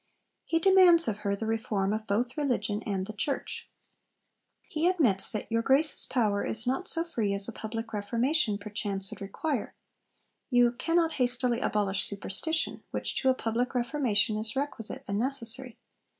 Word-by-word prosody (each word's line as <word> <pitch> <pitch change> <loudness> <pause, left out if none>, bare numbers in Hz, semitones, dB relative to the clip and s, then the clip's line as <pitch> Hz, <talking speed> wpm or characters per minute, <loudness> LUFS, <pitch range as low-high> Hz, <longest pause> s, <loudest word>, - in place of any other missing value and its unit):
He 330 - +1
demands 355 -1 +6
of 215 -2 -1
her 200 -1 -1
the 220 - -5
reform 215 -3 -1
of 215 0 -4
both 240 +5 0
religion 225 -8 -1
and 190 -2 -1
the 215 - -7
church. 215 +8 -3 0.9
He 320 +2 -1
admits 270 - +4
that 215 - -3
'your 230 0 +2
Grace's 275 +6 +3
power 210 -5 +1
is 220 +2 -2
not 265 +10 -1
so 330 - +1
free 225 -12 -1
as 200 0 -3
a - - -4
public 225 +1 -6
Reformation 230 +3 0
perchance 205 -1 -4
would 215 - -9
require'; 230 +6 -3 0.7
you 245 -2 +4
'cannot 330 +6 +1
hastily 245 -1 +1
abolish 200 -4 0
superstition,... 210 +11 -2
which - - -2
to 265 - +3
a 260 - +4
public 245 +3 -2
Reformation 240 -4 +1
is 215 0 -3
requisite 270 -5 -4
and 200 +1 -1
necessary. 250 -1 -3
230 Hz, 160 wpm, -29 LUFS, 210-270 Hz, 0.9 s, demands